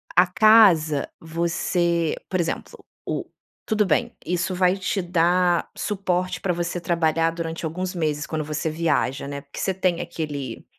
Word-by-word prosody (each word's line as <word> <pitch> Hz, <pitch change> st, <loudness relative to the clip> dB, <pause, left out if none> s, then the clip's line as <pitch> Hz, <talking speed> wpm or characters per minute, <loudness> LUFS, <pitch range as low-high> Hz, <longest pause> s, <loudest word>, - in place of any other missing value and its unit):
a 180 Hz, -, +7 dB
casa, 180 Hz, -8 st, +5 dB
você 170 Hz, 0 st, 0 dB
por 185 Hz, -, -1 dB
exemplo, 165 Hz, -, -4 dB, 0.2 s
o -, -, -3 dB, 0.4 s
tudo 215 Hz, -2 st, +2 dB
bem, 155 Hz, -7 st, 0 dB
isso 180 Hz, +1 st, -1 dB
vai 180 Hz, +1 st, +3 dB
te 195 Hz, +1 st, -1 dB
dar 175 Hz, 0 st, +2 dB
suporte 185 Hz, -3 st, -1 dB
pra 180 Hz, -2 st, 0 dB
você 175 Hz, +1 st, -2 dB
trabalhar 165 Hz, -2 st, +1 dB
durante 165 Hz, 0 st, -4 dB
alguns 180 Hz, +4 st, -3 dB
meses 155 Hz, -4 st, -1 dB
quando 155 Hz, -1 st, -3 dB
você 155 Hz, +1 st, -2 dB
viaja, 150 Hz, -4 st, 0 dB
né. 140 Hz, 0 st, -5 dB
Porque 140 Hz, 0 st, -11 dB
você 190 Hz, -, 0 dB
tem 180 Hz, -2 st, 0 dB
aquele 145 Hz, -7 st, -5 dB
170 Hz, 150 wpm, -23 LUFS, 160-180 Hz, 0.4 s, a